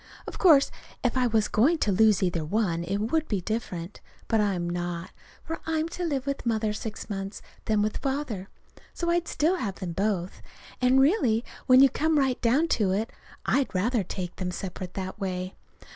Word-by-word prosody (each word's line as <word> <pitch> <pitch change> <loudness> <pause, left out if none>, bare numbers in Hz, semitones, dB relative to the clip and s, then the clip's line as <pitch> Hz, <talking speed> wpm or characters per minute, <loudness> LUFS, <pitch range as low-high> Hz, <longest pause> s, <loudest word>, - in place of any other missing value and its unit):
Of - - -8
course 305 -7 +6 0.3
if 245 -1 +1
I 255 -1 +3
was 220 -2 +2
going 280 +11 +3
to 215 - +1
lose 210 0 +4
either 175 -3 0
one, 170 -1 0
it 190 +4 -1
would 305 +10 0
be 205 - 0
different. 185 -3 -4 0.3
But 225 -1 +2
I'm 190 -4 0
not, 175 0 -3 0.3
for 325 - -5
I 320 0 0
am 315 +1 0
to 355 +1 -5
live 280 -6 -1
with 280 0 -3
Mother 220 -2 0
six 215 0 -6
months, 195 -1 -5 0.2
then 215 -2 +2
with 215 - -1
Father. 265 -9 -3 0.5
So 340 0 0
I 345 0 +3
still 330 +5 +1
have 205 - -3
them 180 -2 -5
both. 190 -1 -1 0.4
And, 255 +1 +5
really, 265 - +3 0.2
when 255 0 +8
you 275 - +8
come 315 +2 +1
right 265 -3 +1
down 265 +8 +3
to 200 -3 +2
it, 215 +4 -1 0.3
I'd 275 -8 +1
rather 220 +4 +1
take 180 0 -5
them 185 -1 -2
separate 180 0 -6
that 190 +2 -5
way. 185 -1 -3
220 Hz, 190 wpm, -27 LUFS, 190-270 Hz, 0.5 s, when